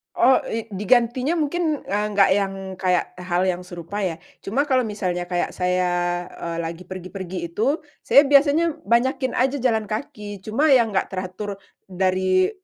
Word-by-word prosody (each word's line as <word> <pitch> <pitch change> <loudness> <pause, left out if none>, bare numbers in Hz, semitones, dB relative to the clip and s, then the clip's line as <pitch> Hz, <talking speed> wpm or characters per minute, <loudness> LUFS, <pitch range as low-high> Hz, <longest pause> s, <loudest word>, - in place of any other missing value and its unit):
Oh, 260 +2 +5
i 225 0 -3
digantinya 240 - +2
mungkin, 315 0 -1
eee, 205 +1 -1
nggak 195 -1 +5
yang 195 -1 0 0.3
kayak 180 -2 +1
hal 180 0 0
yang 180 -1 0
serupa, 180 +2 -7
ya. 180 -4 -1 0.3
Cuma 250 +8 0
kalau 260 -3 +2
misalnya 180 -4 -3
kayak 175 -1 -1
saya, 175 -1 0
eee, 170 -1 -5
lagi 165 +2 -6
pergi-pergi 185 -2 -6
itu, 265 - 0 0.2
saya 280 - +6
biasanya 290 +4 +4
banyakin 260 +2 +1
aja 265 +2 +1
jalan 225 -4 +1
kaki. 210 -3 -6
Cuma 260 +10 +1
yang 235 -4 +4
nggak 190 - 0
teratur 190 +2 -5 0.3
dari 185 0 +1
200 Hz, 150 wpm, -23 LUFS, 180-255 Hz, 0.3 s, saya